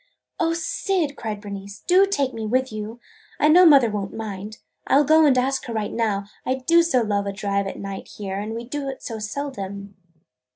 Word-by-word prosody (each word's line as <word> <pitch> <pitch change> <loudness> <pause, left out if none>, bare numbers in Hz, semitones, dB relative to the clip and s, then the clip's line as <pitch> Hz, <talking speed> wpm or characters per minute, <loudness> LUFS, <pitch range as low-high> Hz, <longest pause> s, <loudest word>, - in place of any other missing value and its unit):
"O 330 -1 +2
Syd!" 335 -2 -1
cried 215 -4 -5
Bernice, 200 0 -8
"do 375 +2 +5
take 280 -9 0
me 225 - -5
with 255 +3 +1
you! 215 +2 -6 0.4
I 300 - +4
know 355 +3 +8
mother 270 -7 +6
won't 200 -2 -4
mind. 215 -1 -6 0.3
I - - +3
'll 290 - +5
go 315 +2 +5
and 265 -3 +4
ask 265 +2 0
her 235 - -5
right 215 -2 -2
now. 210 -4 0 0.2
I 260 - 0
do 330 +6 +4
so 295 -8 +2
love 205 -2 0
to 200 - -2
drive 200 0 -1
at - - -6
night 195 -1 -6
here, 195 -1 -5
and 215 +2 -4
we 230 - -5
do 275 +3 -4
it 265 - -8
so 225 -2 -5
seldom!" 205 -4 -5
230 Hz, 210 wpm, -23 LUFS, 205-285 Hz, 0.4 s, know